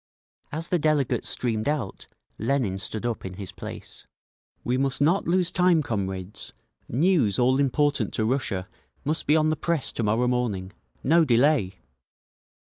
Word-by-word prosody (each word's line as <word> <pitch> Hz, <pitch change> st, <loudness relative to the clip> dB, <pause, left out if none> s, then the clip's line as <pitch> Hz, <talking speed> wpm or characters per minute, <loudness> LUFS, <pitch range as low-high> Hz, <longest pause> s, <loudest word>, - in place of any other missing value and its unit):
As 160 Hz, +3 st, -4 dB
the 180 Hz, -, +2 dB
delegates 150 Hz, -4 st, +1 dB
streamed 115 Hz, 0 st, -1 dB
out, 140 Hz, -10 st, -3 dB, 0.3 s
Lenin 115 Hz, -5 st, 0 dB
stood 105 Hz, +4 st, -4 dB
up 120 Hz, -3 st, -2 dB
in 95 Hz, -, -6 dB
his 95 Hz, -2 st, -7 dB
place. -, -, -9 dB, 0.6 s
"We 125 Hz, -, 0 dB
must 135 Hz, 0 st, 0 dB
not 165 Hz, +7 st, +2 dB
lose 180 Hz, 0 st, +2 dB
time, 180 Hz, -4 st, +3 dB
comrades! 95 Hz, -6 st, -4 dB, 0.4 s
News 140 Hz, -, +2 dB
all 130 Hz, +2 st, +3 dB
important 140 Hz, -4 st, +1 dB
to 110 Hz, -, 0 dB
Russia 110 Hz, -7 st, -1 dB, 0.4 s
must 155 Hz, +3 st, -1 dB
be 150 Hz, -, +5 dB
on 155 Hz, 0 st, +3 dB
the -, -, +1 dB
press 160 Hz, -1 st, 0 dB
to -, -, -4 dB
morrow 115 Hz, +3 st, +2 dB
morning. 110 Hz, -7 st, -1 dB, 0.3 s
No 165 Hz, +4 st, +5 dB
delay!" 125 Hz, -7 st, +2 dB
130 Hz, 150 wpm, -25 LUFS, 110-155 Hz, 0.6 s, be